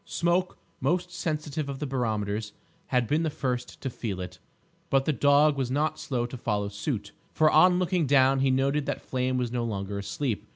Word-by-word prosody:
Smoke, 175 +2 0 0.2
most 175 +6 0
sensitive 155 -3 -3
of 140 - -4
barometers, 110 -6 -2 0.3
had 125 -2 +2
been 150 +8 +1
the 165 - 0
first 125 -4 -3
to 135 - -2
feel 105 -6 -4
it, 90 - -7 0.5
but 135 0 +3
the 155 - +2
dog 145 +3 +4
was 135 -3 -1
not 155 +3 0
slow 120 -3 -2
to 125 +1 -7
follow 105 -4 -1
suit, 105 0 -4 0.2
for 155 -1 +3
on 180 +3 +6
looking 180 -3 +1
down 135 0 +4
he 135 0 +3
noted 135 +2 +1
that - - -1
Flame 130 0 -1
was 125 -2 -1
no 120 -1 -1
longer 100 -3 -3
asleep. 115 +3 -3
135 Hz, 190 wpm, -27 LUFS, 120-150 Hz, 0.5 s, on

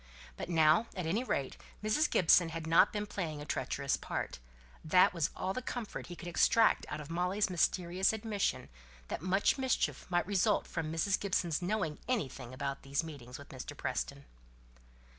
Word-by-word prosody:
But - - -6
now, 160 +5 +4
at 180 -3 -3
any 200 +10 0
rate, 140 - -2 0.3
Mrs. 215 +9 +2
Gibson 170 0 +5
had 165 0 -5
not 165 +4 +5
been 210 0 -2
playing 165 -7 -4
a 145 - -7
treacherous - - -1
part; - - -4 0.4
that 180 +4 +5
was 170 -1 0
all 190 +1 -2
the 255 - -3
comfort 245 -3 -5
he 175 - -7
could 175 - -9
extract 225 +6 +3
out 155 - -4
of 150 +1 -8
Molly's 185 +4 0
mysterious 180 +1 +2
admission, 220 -2 -2 0.4
that - - -3
much 190 - +2
mischief 260 -6 0
might 175 -1 +1
result 205 +2 +2
from 160 -2 -4
Mrs. 165 +4 +1
Gibson's 180 -5 0
knowing 180 -5 -1
anything 135 - -2
about 140 +1 -4
these 140 +3 -1
meetings 135 -6 -9
with 145 - -12
Mr. 135 +2 -8
Preston. 140 +1 -3
175 Hz, 170 wpm, -33 LUFS, 155-200 Hz, 0.4 s, Gibson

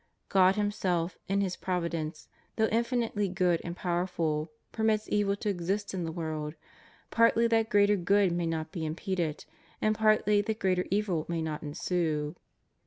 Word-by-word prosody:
God 190 0 +5
Himself, 185 -5 -1
in 195 +1 +1
His 185 -2 -1
providence, 170 -3 -3 0.3
though 220 - +3
infinitely 230 -3 0
good 180 -2 +1
and 170 0 -5
powerful 170 -4 -1 0.2
permits 220 -1 +1
evil 205 -1 +2
to 210 +1 -3
exist 195 +2 -2
in 180 -3 -2
the 165 - -3
world, 155 -2 -4 0.6
partly 230 0 +4
that 225 -1 +2
greater 205 -1 +4
good 195 +1 +3
may 170 0 -1
not 160 -1 -3
be 170 -4 -4
impeded, 165 0 -2 0.3
and 215 - +2
partly 215 -1 +3
that 215 +1 -2
greater 185 -3 +1
evil 190 -5 0
may 165 -1 -1
not 155 -1 -3
ensue. 150 0 -1
185 Hz, 155 wpm, -29 LUFS, 165-205 Hz, 0.6 s, God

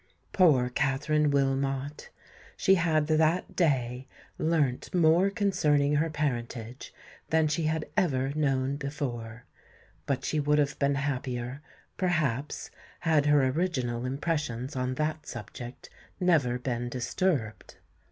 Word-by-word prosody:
Poor 145 -10 +4
Katherine 150 +3 +1
Wilmot! 135 0 -1 0.5
she 190 - +4
had 165 -4 +2
that 160 +3 +1
day 130 -6 0 0.3
learnt 150 -6 0
more 170 +3 +4
concerning 150 -9 +2
her 160 +2 +1
parentage 125 -5 -4 0.4
than 160 -1 +3
she 155 +1 -1
had 160 0 0
ever 135 -9 +1
known 135 -2 0
before; 125 -5 -5 0.6
but 140 -2 -1
she 155 - 0
would 150 +1 +2
have 145 -1 0
been 140 0 +2
happier, 130 -1 -3 0.4
perhaps, 150 -7 -1 0.3
had 155 -4 +2
her 145 -2 +5
original 130 -7 -1
impressions 135 -2 -2
on 125 0 -1
that 155 +1 -2
subject 120 -1 -8 0.3
never 155 -10 +2
been 120 -1 -3
disturbed! 125 - -2
145 Hz, 115 wpm, -28 LUFS, 130-155 Hz, 0.6 s, her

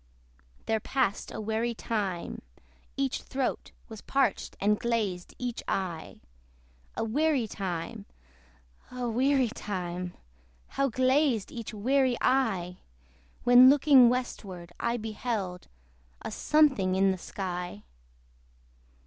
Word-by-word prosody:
There 220 0 +1
passed 250 -3 -1
a - - -6
weary 220 +2 -1
time. 200 -7 -3 0.6
Each 275 -1 -1
throat 265 -1 -3 0.2
Was 220 -3 -10
parched, 270 -6 0
and 210 +1 +2
glazed 210 -7 -2
each 245 -2 -4
eye. 175 -4 -3 0.8
A - - 0
weary 270 +1 +1
time! 195 +2 -5 0.8
a 250 -1 -4
weary 260 +2 +2
time! 180 -5 -5 0.5
How 275 0 0
glazed 255 -2 +2
each 230 -2 -6
weary 255 +3 +1
eye, 195 -9 +1 0.7
When 245 +1 +8
looking 275 -3 +7
westward, 190 -8 -4
I 235 +1 0
beheld 215 -4 -4 0.6
A - - -4
something 270 -12 +3
in 195 0 +4
the 190 - -4
sky. 180 - -5
225 Hz, 105 wpm, -28 LUFS, 190-255 Hz, 0.8 s, When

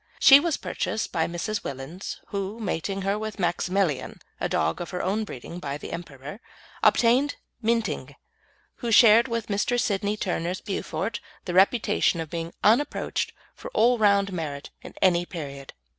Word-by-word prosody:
She 275 0 +9
was 325 0 0
purchased 220 - -3
by 160 -1 0
Mrs. 205 +5 -3
Willins, 140 +8 -6
who, 200 +1 -3
mating 195 -1 -2
her 200 +2 0
with 215 0 -5
Maximilian 175 -4 0 0.2
(a - - -1
dog 80 +1 0
of 175 - -5
her 180 -2 -3
own 210 +4 0
breeding 170 +1 -8
by 140 -3 -4
The - - -8
Emperor), 150 +1 -8 0.4
obtained 250 +5 +4 0.3
Minting, 230 0 -1 0.6
who 235 -2 -3
shared 230 +2 +7
with 230 -2 -2
Mr. 210 +4 0
Sidney 205 -1 0
Turner's 180 -2 -2
Beaufort 205 +1 -3 0.3
the 175 - -3
reputation 200 -1 +3
of 160 -2 -5
being 165 -1 -4
unapproached 235 +8 +2 0.2
for - - -9
all 240 +1 +4
round 200 -2 +3
merit 150 -5 -5
in - - -11
any 175 -2 +4
period. 140 -6 -7
195 Hz, 155 wpm, -26 LUFS, 170-220 Hz, 0.6 s, She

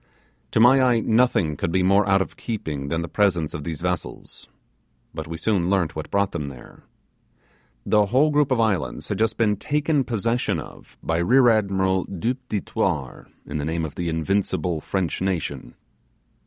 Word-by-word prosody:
To - - 0
my 125 +4 +6
eye 125 -3 +3
nothing 110 -9 +2
could 80 - -2
be 95 +1 +2
more 100 +2 +3
out 95 0 +4
of - - -14
keeping 80 - -4
than 80 +3 -1
the - - -5
presence 90 -4 +1
of 75 - -5
these 80 0 -5
vessels; 90 0 -5 0.6
but 80 0 -6
we 80 0 -5
soon 90 0 0
learnt 95 -5 +1
what 80 -1 -5
brought 100 -1 +1
them 75 -4 -4
there. 65 -3 -13 1.0
The 105 -1 +3
whole 135 +8 +3
group 150 -1 +2
of 130 -3 +1
islands 105 -8 -1
had - - -2
just 110 0 +1
been 105 -3 +2
taken 150 +3 0
possession 115 0 -1
of - - -12
by 80 0 0
Rear 125 +8 +5
Admiral 95 -4 +1
Du 100 +6 -2
Petit 125 -6 -4
Thouars, 65 -6 -2 0.2
in 75 - -4
the 70 - -3
name 80 +1 -1
of 75 - -7
the 85 -1 -3
invincible 85 0 -1
French 95 -1 -2
nation. 95 -4 -3
95 Hz, 180 wpm, -23 LUFS, 80-115 Hz, 1.0 s, my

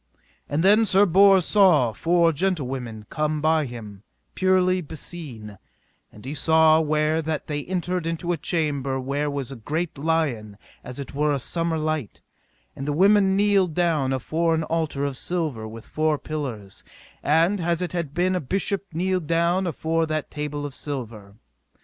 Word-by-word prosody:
And 150 +3 0
then 210 +4 +6
Sir 195 +2 +5
Bors 195 0 +5
saw 175 - +4
four 170 +8 +2
gentlewomen 135 - -3
come 155 0 -1
by 155 -1 +2
him, 105 -5 -9 0.3
purely 185 -1 +2
beseen: 140 - -8 0.5
and 105 - -15
he 135 - -4
saw 160 +1 +4
where 155 +1 +1
that 155 -1 -3
they 145 -1 -3
entered 180 -2 -2
into 165 +1 -2
a 175 - 0
chamber 140 -5 -1
where 140 +3 -2
was 140 -2 -4
great 155 +1 -3
light 140 -10 -1 0.3
as 125 0 -8
it 140 -2 -7
were 150 +1 +1
a 145 - +1
summer 165 +4 -2
light; 155 -6 -3 0.6
and 135 - -6
the 145 - 0
women 195 +3 +4
kneeled 195 -5 +2
down 160 -7 +1
afore 160 +5 0
an 160 - -1
altar 155 -3 -1
of 140 -2 -3
silver 155 -12 -3
with 110 0 -10
four 155 -1 0
pillars, 125 -12 -6 0.4
and 170 +6 +2
as 170 0 0
it 180 - -4
had 170 -5 -4
been 185 +2 +1
a 180 - -1
bishop 195 +6 -1
kneeled 180 0 -1
down 170 +3 +1
afore 165 0 -1
that 155 -1 -3
table 150 -1 -4
of 145 - -6
silver. 115 -9 -7
155 Hz, 160 wpm, -24 LUFS, 140-175 Hz, 0.6 s, then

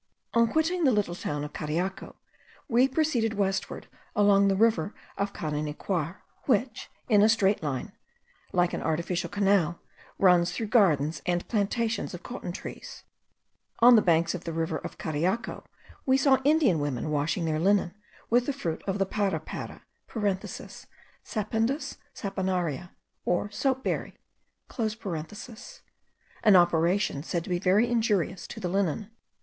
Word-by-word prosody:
On 230 -1 +3
quitting 330 +3 +1
the 270 - +5
little 205 -6 0
town 150 -4 -3
of 150 - -7
Cariaco, 175 +6 -3 0.5
we 245 +1 +4
proceeded 260 -6 0
westward 195 -1 -1 0.3
along 200 -1 +5
the 195 - +2
river 210 -3 +2 0.2
of 200 0 -1
Carenicuar, 155 +3 -3 0.2
which, 240 -2 0 0.2
in 210 -4 +5
a 215 - +6
straight 205 -2 +3
line 140 -5 -3 0.6
like 175 -1 +2
an - - -2
artificial 170 +2 -1
canal, 195 -4 +2 0.4
runs 180 -2 +4
through 225 - -2
gardens 155 - +3
and 175 0 0
plantations 220 -1 -1
of 175 - -11
cotton 215 -7 -6
trees. 180 - -8 0.7
On 240 +1 +8
the 220 - +6
banks 170 -2 +2
of 180 -1 -5
the 165 - -4
river 160 -1 -1
of - - -8
Cariaco 170 +9 -2 0.4
we 260 0 +5
saw 270 -1 +4
the 270 +2 +1
Indian 285 - +3
women 145 0 -2
washing 150 +3 0
their 155 -1 0
linen 190 0 +2 0.3
with 245 +1 +2
the 285 - 0
fruit 170 - -3
of 195 0 0
the 195 - +1
parapara 190 -5 -3 1.4
(Sapindus 225 +6 -2 0.2
saponaria, 180 - -2 0.3
or 180 +4 0
soap 265 +3 0
berry), - - -3 0.6
an 215 - -3
operation 175 -2 +3
said 170 +2 -2
to - - -9
be 175 - +1
very 195 +5 +3
injurious 210 -6 0
to 225 - -8
the 185 - -2
linen. 195 +3 -1
195 Hz, 140 wpm, -28 LUFS, 170-225 Hz, 1.4 s, On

